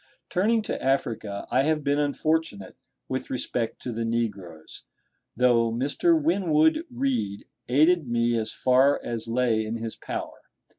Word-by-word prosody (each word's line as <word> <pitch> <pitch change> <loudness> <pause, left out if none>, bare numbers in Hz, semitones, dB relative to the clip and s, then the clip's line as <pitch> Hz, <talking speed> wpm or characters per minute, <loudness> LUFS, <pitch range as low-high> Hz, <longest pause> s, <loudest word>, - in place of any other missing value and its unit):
Turning 215 +5 +2
to - - -4
Africa, 115 -6 -1
I 130 - +3
have 155 +1 0
been 145 +1 +1
unfortunate 145 - -1 0.3
with 130 0 -4
respect 120 -2 -3
to 125 - -3
the 115 0 -3
negroes, 100 -9 -4 0.5
though 120 -2 +3
Mr. 145 - +2
Winwood 195 - +2
Reade 245 - -2 0.2
aided 155 +4 +3
me 120 0 +1
as 110 -1 -1
far 130 +3 +3
as 115 -1 -4
lay 115 -2 +1
in 110 +1 -4
his 115 -1 -5
power. - - -6
125 Hz, 140 wpm, -26 LUFS, 115-155 Hz, 0.5 s, I